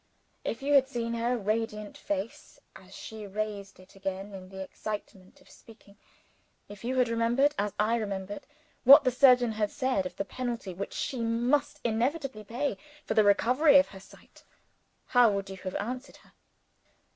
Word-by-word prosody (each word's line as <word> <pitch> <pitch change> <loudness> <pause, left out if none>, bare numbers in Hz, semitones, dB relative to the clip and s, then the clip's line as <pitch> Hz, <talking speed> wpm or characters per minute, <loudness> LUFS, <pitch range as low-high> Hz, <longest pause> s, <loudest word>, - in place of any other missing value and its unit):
If 230 - -4
you 290 +1 +1
had 270 -2 +6
seen 235 -2 -3
her 235 +2 0
radiant 215 0 -2
face 200 +2 -5 0.2
as - - -14
she 220 -2 -8
raised 200 -1 -5
it 185 +1 -18
again 195 +1 -5
in 185 -1 -9
the 190 0 -6
excitement 195 -2 -8
of - - -22
speaking; 215 -3 -18 0.7
if 205 0 -12
you 255 +2 -2
had 250 -1 +4
remembered 235 +5 +2
(as 205 0 0
I 220 +3 +2
remembered) 200 -2 -5 0.4
what 275 +3 +9
her 255 - +3
surgeon 250 -2 +5
had 215 -1 -1
said 255 -8 -1
of 180 - -13
the 195 - -3
penalty 235 -3 -4
which 195 +3 -6
she 265 -4 -3
must 240 +6 0
inevitably 245 +1 -1
pay 245 +7 -3 0.3
for - - -1
the 215 - +5
recovery 255 +9 +5
of 280 - +4
her 195 - -11
sight 190 - -18 0.6
how 245 -2 +5
would 195 -1 -3
you 190 - -7
have 185 0 -6
answered 250 +5 -5
her? - - -23
225 Hz, 170 wpm, -29 LUFS, 200-250 Hz, 0.7 s, what